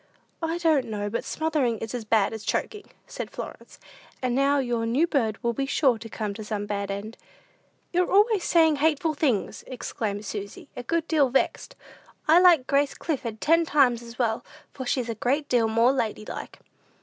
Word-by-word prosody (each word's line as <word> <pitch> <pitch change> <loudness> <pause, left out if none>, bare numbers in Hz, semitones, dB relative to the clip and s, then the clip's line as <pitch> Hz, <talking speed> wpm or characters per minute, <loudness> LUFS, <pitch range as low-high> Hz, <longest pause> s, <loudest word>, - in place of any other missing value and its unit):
"I 325 +1 -1
don't 320 -6 +2
know 205 -2 -3
but 230 - -2
smothering 300 -7 0
is 225 +2 -6
as 240 -3 -4
bad 215 -1 +2
as 220 -1 -6
choking," 420 - -2 0.2
said - - -6
Florence; - - -9 0.4
"and 250 -2 -1
now 275 +2 +3
your 240 -4 -1
new 265 +8 +3
bird 230 -10 0
will 235 0 +1
be 270 +4 -2
sure 265 -5 +2
to 225 0 -9
come 210 -1 -4
to 215 +2 -7
some 210 -1 -3
bad 200 -1 -3
end." 205 +3 -6 0.7
"You're 360 +1 +1
always 415 -1 +4
saying 320 -3 +4
hateful 310 +1 +1
things," 270 -9 -1
exclaimed 215 -4 -4
Susy, 200 0 -7
a - - -5
good 330 +6 -1
deal 295 -5 +3
vexed. 265 - -1 0.5
"I 320 +3 +7
like 345 -7 +6
Grace 280 +1 +1
Clifford 235 -8 -3
ten 330 +2 +4
times 270 -7 +3
as 235 0 -11
well, 230 -3 0 0.3
for 260 -2 -6
she's 250 -1 0
a 230 - -2
great 270 +7 -1
deal 235 -3 +2
more 230 +3 +4
lady 220 -4 -2
like." - - -7
250 Hz, 185 wpm, -26 LUFS, 220-305 Hz, 0.7 s, I